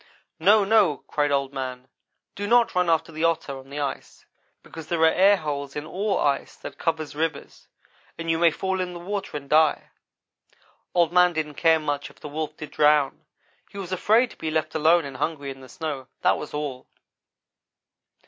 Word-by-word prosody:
"'No! 210 +1 +5
No!' 200 -8 +4
cried 145 -1 0
Old 140 -1 0
man, 130 -1 -5 0.5
'do 205 +1 -4
not 235 +1 +4
run 180 -1 +1
after 165 0 +1
the 160 +1 -4
Otter 165 -4 0
on 135 0 -15
the 145 +1 -6
ice, 140 -2 -5 0.4
because 160 -2 -10
there 170 -2 -1
are - - +8
air 195 +5 +5
holes 140 -4 -4
in 150 0 -4
all 195 +3 -1
ice 140 -1 0
that - - -10
covers 160 -2 -2
rivers, 155 -2 -4 0.5
and 165 - -6
you 165 0 +1
may 170 0 +6
fall 190 +3 -2
in 180 -1 -4
the 175 - -7
water 195 -2 -4
and 140 -1 -10
die.' 155 +1 +3 1.0
Old 170 -1 +3
man 180 0 +5
didn't 155 -2 -3
care 160 +2 +3
much 145 -2 -3
if - - -20
the - - -8
Wolf 155 +1 -4
did 155 - -8
drown. 150 -2 +2 0.4
He - - -12
was 190 -2 -6
afraid 220 +6 +3
to - - -15
be 160 - -3
left 155 0 -1
alone 160 +1 +3
and 135 -2 -7
hungry 145 -1 -3
in 135 0 -11
the 130 - -13
snow 155 -7 -5
that - - +3
was 150 - -7
all. 145 -4 -5
160 Hz, 195 wpm, -24 LUFS, 145-180 Hz, 1.0 s, are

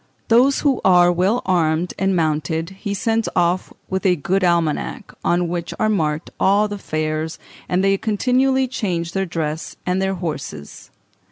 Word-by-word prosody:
Those 250 +4 +4
who 275 -4 +1
are 175 -1 +6
well 190 +7 +1
armed 170 -2 +1
and 195 0 +1
mounted 160 +1 -1
he 200 +1 -5
sends 225 +3 0
off 175 +1 +1 0.2
with 190 0 -2
a 185 -3 +4
good 185 +5 0
almanac, 170 -4 0
on 175 0 +1
which 170 0 -4
are 215 - +2
marked 160 -6 -1
all 205 +2 +3
the 205 -1 -6
fairs, 155 -1 -2 0.3
and 180 +1 +1
they 195 0 +4
continually 260 +4 +1
change 175 -9 -2
their 195 +1 -1
dress 160 -2 -4
and 185 +1 0
their 190 0 0
horses. 150 - -6
180 Hz, 160 wpm, -20 LUFS, 165-200 Hz, 0.3 s, are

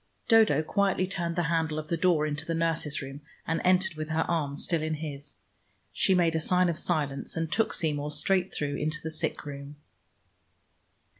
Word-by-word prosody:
Dodo 220 - +5
quietly 195 +2 +1
turned 170 -3 -3
the 175 - +1
handle 160 -1 0
of 155 0 -5
the 170 - +1
door 165 -2 +2
into 150 0 -3
the 165 +1 -3
nurse's 165 -3 0
room, 135 +2 -8 0.2
and 165 +1 -1
entered 185 0 +4
with 155 0 -6
her 160 0 +1
arm 150 -5 -1
still 165 +2 -1
in 155 0 -1
his. 145 -2 -6 0.6
She 190 - +3
made 170 -2 +2
a - - +2
sign 180 +2 +3
of 170 -1 -1
silence, 150 -4 -2
and 165 -1 -2
took 225 - +1
Seymour 150 -2 -1
straight 185 +5 +2
through 145 -1 -2
into 155 +2 -1
the 160 - -4
sick 160 0 -3
room. 140 0 -8
160 Hz, 190 wpm, -28 LUFS, 150-175 Hz, 0.6 s, Dodo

